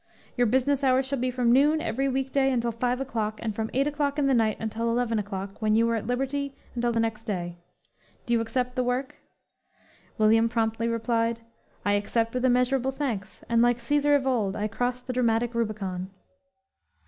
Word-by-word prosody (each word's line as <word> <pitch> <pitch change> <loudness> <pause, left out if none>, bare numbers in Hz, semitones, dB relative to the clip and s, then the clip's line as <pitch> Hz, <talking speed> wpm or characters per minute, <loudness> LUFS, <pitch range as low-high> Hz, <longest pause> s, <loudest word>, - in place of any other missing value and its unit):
"Your 245 -1 +3
business 265 +4 +1
hours 260 0 +3
shall 270 0 -2
be 255 +1 0
from 245 -1 +1
noon, 295 +5 +4
every 270 0 -1
week 265 0 -2
day, 270 -1 +2
until 235 -2 0
five 245 +2 -1
o'clock; 220 -5 -3
and 220 -2 -2
from 220 0 -2
eight 270 +2 +1
o'clock 290 -1 -1
in 290 - +2
the 275 - +3
night 225 -3 +2
until 225 +1 -2
eleven 230 -1 +1
o'clock, 195 0 -6
when 215 0 +2
you 230 +1 +4
are - - +1
at 220 - -4
liberty 270 +2 -2 0.2
until 240 0 0
the 230 - 0
next 225 -1 -2
day! 175 -4 -4 0.7
"Do 240 - 0
you 230 - +3
accept 250 +2 -2
the 255 - +1
work?" 250 +2 -2 1.0
William 225 +1 +4
promptly 225 -1 0
replied: 230 0 0 0.4
"I 205 - +3
accept 225 +3 0
with 250 0 -2
immeasurable 255 +1 +2
thanks, 235 -9 -4
and 230 0 +3
like 240 0 +4
Cæsar 290 +4 +2
of 275 -2 +1
old, 220 -7 0
I 210 - -1
cross 245 +3 -2
the 250 0 -5
dramatic 240 -1 +1
Rubicon." 200 -5 -3
240 Hz, 195 wpm, -26 LUFS, 225-260 Hz, 1.0 s, noon